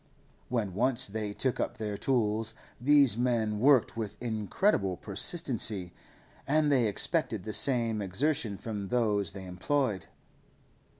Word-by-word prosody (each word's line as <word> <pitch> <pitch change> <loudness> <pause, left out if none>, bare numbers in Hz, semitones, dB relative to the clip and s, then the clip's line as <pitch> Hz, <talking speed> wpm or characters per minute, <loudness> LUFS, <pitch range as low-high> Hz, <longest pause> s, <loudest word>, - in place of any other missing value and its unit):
When 110 -6 -2
once 125 +4 +1
they 105 0 -4
took 130 +4 -1
up - - -3
their 105 -2 -4
tools, 110 -2 -1 0.2
these 140 -3 +4
men 115 -4 0
worked 135 0 +3
with 110 -3 -5
incredible 110 - -1
persistency, 105 - +2 0.5
and 150 +1 +2
they 125 -5 +3
expected 115 - -1
the 110 - -6
same 115 -5 +2
exertion 105 +2 -1
from 105 -3 -6
those 105 -5 0
they 95 -2 -9
employed. 95 +2 -2
110 Hz, 125 wpm, -29 LUFS, 100-130 Hz, 0.5 s, these